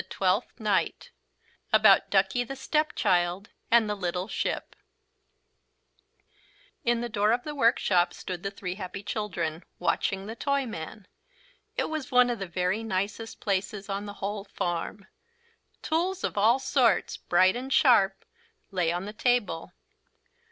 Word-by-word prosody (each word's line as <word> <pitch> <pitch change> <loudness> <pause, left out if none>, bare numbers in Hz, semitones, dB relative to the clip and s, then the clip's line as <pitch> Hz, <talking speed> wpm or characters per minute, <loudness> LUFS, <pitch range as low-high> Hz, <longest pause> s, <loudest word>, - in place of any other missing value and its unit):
TWELFTH 195 +6 0
NIGHT 210 -3 0 0.6
ABOUT - - +6
DUCKIE 245 -2 +2
THE 270 - -6
STEPCHILD 200 - 0 0.2
AND 230 -2 +5
THE 210 - 0
LITTLE 180 -1 -3
SHIP - - -3 2.1
In 235 0 +1
the 240 - -2
door 210 -1 +1
of 245 +1 +1
the 300 - -5
workshop 205 -9 +3
stood 180 -1 -6
the 195 - -2
three 195 -2 -5
happy 190 +1 -7
children, 180 -6 -3
watching 195 0 0
the 220 +2 -6
Toyman. 230 - -3 0.7
It - - +1
was 310 -3 -4
one 250 -1 +5
of 235 - -3
the 195 - -4
very 180 +4 -1
nicest 210 +2 -3
places 200 0 -2
on 200 +1 -3
the 205 - -6
whole 200 +1 -3
farm. 175 +1 -3 0.8
Tools 355 +4 -1
of - - -2
all 220 +5 +4
sorts, 265 -2 +2
bright 185 +3 +3
and 260 +2 -5
sharp, 200 -9 +4 0.5
lay 180 -4 +1
on 175 +2 -3
the 210 - -6
table. 215 -9 0
205 Hz, 135 wpm, -27 LUFS, 185-240 Hz, 2.1 s, ABOUT